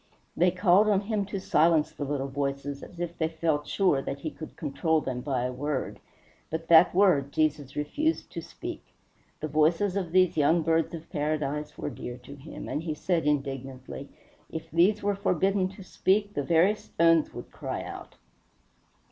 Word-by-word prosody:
They 180 +2 +4
called 185 +3 +4
on 200 -2 +3
him 205 -1 -1
to 200 -1 -4
silence 160 -3 +3
the 145 - -5
little 140 -1 -2
voices, 140 0 -3
as 175 - -11
if 175 -1 -3
they 160 - +2
felt 160 -2 -1
sure 180 -9 +2
that 140 +1 -5
he 155 - -3
could 155 - -10
control 160 +1 0
them 130 -4 -4
by 130 -2 -1
a 125 - -1
word; 145 +1 -3 0.5
but 160 +1 -5
that 170 +1 +7
word 175 -8 +4
Jesus 150 -3 0
refused 295 - -1
to - - -5
speak. - - -8 0.6
The 155 - -2
voices 165 +6 +2
of 185 -4 -2
these 185 -2 +3
young 160 +3 +3
birds 165 +1 +1
of 165 0 -9
paradise 150 -1 -2
were 145 - -4
dear 125 -2 -7
to 125 +3 -12
him, 140 +2 -9
and 150 - -2
he 160 -2 -3
said 165 -1 0
indignantly, 135 -1 -3 0.4
"If 160 - -6
these 190 +6 +3
were 205 0 +2
forbidden 195 0 +1
to 195 +1 -11
speak 200 +2 +1
the 145 - -1
very 165 +7 +4
stones 165 -6 +2
would - - -8
cry - - -5
out." - - -9
160 Hz, 180 wpm, -28 LUFS, 145-185 Hz, 0.6 s, that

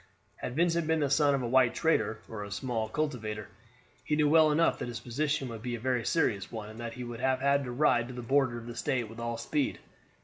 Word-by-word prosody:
Had 125 - -5
Vincent 170 0 +2
been 160 -1 +2
the 140 -2 +1
son 145 0 +4
of 135 - -2
a - - -1
white 125 0 +4
trader, 110 -10 +1
or 110 -2 -6
a 100 - -7
small 110 +1 -2
cultivator, 110 -8 -3 0.5
he 150 - 0
knew 150 -1 +3
well 155 0 +6
enough 165 +3 +2
that - - -3
his 120 -1 -5
position 140 +3 -1
would 115 -2 -7
be 120 0 -3
a - - -6
very 125 0 0
serious 105 - 0
one, 110 -2 -6
and 110 - -12
that 115 -1 -5
he 125 - -6
would 120 -1 -6
have 130 0 +1
had 140 +1 +2
to 125 - -5
ride 120 -3 +2
to 130 - -8
the 125 - -6
border 130 -1 +2
of 115 - -8
the 120 0 -7
State 120 -1 -1
with 115 - -10
all 115 0 -3
speed. 135 +4 -1
125 Hz, 250 wpm, -30 LUFS, 115-145 Hz, 0.5 s, well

